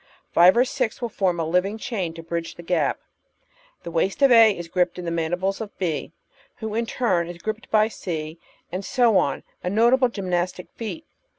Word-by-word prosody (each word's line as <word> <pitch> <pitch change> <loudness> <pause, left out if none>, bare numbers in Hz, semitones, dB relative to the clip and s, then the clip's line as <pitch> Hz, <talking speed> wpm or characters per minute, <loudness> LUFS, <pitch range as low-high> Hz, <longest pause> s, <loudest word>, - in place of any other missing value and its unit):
Five 180 +5 +6
or 250 - +5
six 225 -3 -2
will 240 -2 -3
form 185 -5 0
a 165 - 0
living 180 +6 0
chain 195 -8 -3
to 165 - -8
bridge 165 0 -4
the 170 - -10
gap. 165 -4 0 0.8
The 170 - -6
waist 185 +10 0
of 275 - +6
A 225 -2 +8
is 170 -1 -6
gripped 180 +1 0
in 180 - -6
the 170 - -2
mandibles 175 +5 -1
of 210 -2 -8
B, 170 -5 -2 0.4
who 220 -2 -5
is 225 - 0
in 235 - -1
turn 180 -10 0
gripped 215 +1 -4
by 215 0 +4
C, 165 -6 -5 0.3
and 185 +3 -4
so 240 -1 +3
on 140 -5 0
— - - -40
a 180 - -1
notable 240 +5 +4
gymnastic 180 -4 -3
feat. 240 +8 -6
185 Hz, 200 wpm, -24 LUFS, 170-225 Hz, 0.8 s, A